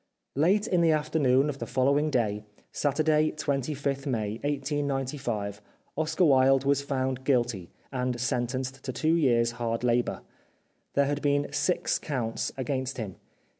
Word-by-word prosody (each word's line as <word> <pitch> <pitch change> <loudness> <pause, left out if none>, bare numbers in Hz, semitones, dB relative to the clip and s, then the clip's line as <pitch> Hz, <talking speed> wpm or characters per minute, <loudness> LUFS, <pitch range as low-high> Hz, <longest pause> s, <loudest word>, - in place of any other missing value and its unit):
Late 185 +9 +3
in 180 -5 +2
the 165 - +4
afternoon 150 -3 +2
of 145 -2 -4
the - - -4
following 140 +4 +2
day, 105 -6 0 0.3
Saturday, 155 +1 +2
25th 140 -1 -2
May 110 -4 -2
1895, 135 -7 -2 0.3
Oscar 160 +4 +1
Wilde 135 -2 +5
was 140 0 +3
found 130 -2 -2
guilty 120 -9 0 0.2
and 125 -2 -2
sentenced 130 +2 -2
to 130 - -3
two 160 +5 +1
years 120 -8 +3
hard 115 -1 -3
labour. 120 0 +1 0.7
There 140 - +4
had 145 +1 -1
been 145 -1 +1
six 180 +4 +1
counts 120 -6 -2
against 130 0 -2
him. 105 -6 -5
135 Hz, 135 wpm, -28 LUFS, 125-145 Hz, 0.7 s, Wilde